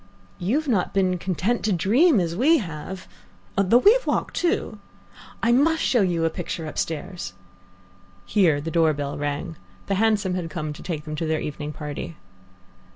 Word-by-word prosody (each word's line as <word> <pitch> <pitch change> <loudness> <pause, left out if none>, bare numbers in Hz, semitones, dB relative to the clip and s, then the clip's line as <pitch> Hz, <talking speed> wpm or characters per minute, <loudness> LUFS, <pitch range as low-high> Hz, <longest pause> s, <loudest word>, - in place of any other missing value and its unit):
"You've 270 - 0
not 200 -9 0
been 185 -2 +2
content 190 +7 -1
to 215 - +2
dream 225 - +4
as 170 -2 -1
we 295 - +4
have 185 - -6 0.3
" - - -31
"Though 195 +4 +4
we 405 - +7
have - - -2
walked, - - 0
too 350 - -1 0.3
" - - -20
"I 230 - +4
must 320 +6 +3
show 240 -2 +3
you 175 -4 +1
a - - +3
picture 170 -1 -5
upstairs 160 - -4 0.5
" 95 0 -29
Here 170 -8 +4
the 160 +3 -5
door 160 -2 +3
bell 145 -1 -4
rang. 145 +3 -3 0.3
The - - -1
hansom 210 -4 +2
had 180 -2 -3
come 155 -2 -4
to - - -11
take 155 -4 -4
them 155 -1 -5
to 160 - -2
their 155 0 0
evening 150 0 -5
party. 150 +2 -6
175 Hz, 185 wpm, -24 LUFS, 155-215 Hz, 0.5 s, we